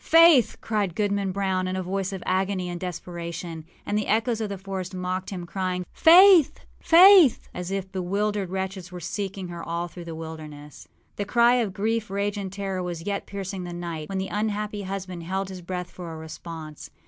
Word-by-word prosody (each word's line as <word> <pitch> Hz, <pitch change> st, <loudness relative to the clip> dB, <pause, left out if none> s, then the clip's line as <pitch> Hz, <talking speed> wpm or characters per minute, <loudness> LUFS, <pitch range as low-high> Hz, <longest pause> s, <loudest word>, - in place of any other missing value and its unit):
âFaith!â 330 Hz, -7 st, +5 dB
shouted 205 Hz, -6 st, 0 dB
Goodman 200 Hz, -2 st, 0 dB
Brown, 190 Hz, -1 st, -1 dB
in 185 Hz, -, -2 dB
a 185 Hz, -, -2 dB
voice 190 Hz, +1 st, -2 dB
of 190 Hz, -2 st, -6 dB
agony 185 Hz, -1 st, 0 dB
and 175 Hz, 0 st, -5 dB
desperation; 170 Hz, -2 st, -6 dB, 0.2 s
and 205 Hz, -, -2 dB
the 210 Hz, -, 0 dB
echoes 225 Hz, +1 st, +1 dB
of 215 Hz, -, -2 dB
the 200 Hz, -, -4 dB
forest 190 Hz, -1 st, -5 dB
mocked 185 Hz, +1 st, -3 dB
him, 180 Hz, -3 st, -5 dB
crying, 180 Hz, 0 st, -3 dB
âFaith! 345 Hz, -2 st, +8 dB, 0.3 s
Faith!â 355 Hz, -, +7 dB
as 180 Hz, 0 st, -5 dB
if 195 Hz, -1 st, -3 dB
bewildered 195 Hz, +1 st, -1 dB
wretches 190 Hz, -1 st, -4 dB
were 180 Hz, -, -7 dB
seeking 190 Hz, +1 st, -4 dB
her 170 Hz, -1 st, -6 dB
all 170 Hz, +1 st, -3 dB
through 175 Hz, 0 st, -10 dB
the 165 Hz, -1 st, -6 dB
wilderness. 155 Hz, -3 st, -9 dB, 0.3 s
The 205 Hz, -, -2 dB
cry 235 Hz, +3 st, +4 dB
of 225 Hz, -5 st, 0 dB
grief, 220 Hz, +1 st, -1 dB
rage, 200 Hz, +1 st, -1 dB
and 195 Hz, -2 st, -4 dB
terror 195 Hz, -1 st, -3 dB
was 175 Hz, -2 st, -5 dB
yet 200 Hz, -1 st, -3 dB
piercing 195 Hz, -1 st, -5 dB
the 175 Hz, 0 st, -6 dB
night, 170 Hz, -3 st, -5 dB
when 195 Hz, -, -3 dB
the 190 Hz, 0 st, -2 dB
unhappy 210 Hz, 0 st, -2 dB
husband 190 Hz, -2 st, -5 dB
held 190 Hz, +3 st, -3 dB
his 185 Hz, -1 st, -8 dB
breath 180 Hz, 0 st, -5 dB
for 175 Hz, -2 st, -8 dB
a 160 Hz, -, -7 dB
response. 160 Hz, -1 st, -8 dB
190 Hz, 195 wpm, -25 LUFS, 175-205 Hz, 0.3 s, âFaith